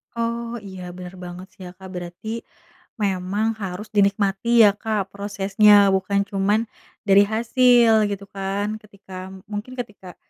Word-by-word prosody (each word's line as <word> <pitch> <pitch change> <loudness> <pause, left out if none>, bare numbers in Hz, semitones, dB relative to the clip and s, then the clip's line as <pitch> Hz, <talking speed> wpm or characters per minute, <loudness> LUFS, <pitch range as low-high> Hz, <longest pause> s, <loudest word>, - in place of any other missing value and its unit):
Oh, 235 0 -3
iya 190 -1 -9 0.2
benar 180 0 -9
banget 180 +1 -8
sih 195 - -17
ya 180 - -9
Kak, 190 0 -11
berarti, 175 +3 -8 0.8
memang 195 +2 -1
harus 190 +3 -5
dinikmati 200 +1 +1 0.2
ya 210 - +8
Kak 210 -3 -2
prosesnya, 200 +1 +3 0.2
bukan 200 +1 0
cuman 200 +2 +1 0.5
dari 200 +1 +7
hasil, 240 0 +4 0.2
gitu 200 0 -5
kan. 200 +2 -2
Ketika 200 -2 -16 0.4
mungkin 210 +5 -5
ketika 200 -6 -8
200 Hz, 135 wpm, -22 LUFS, 190-215 Hz, 0.8 s, ya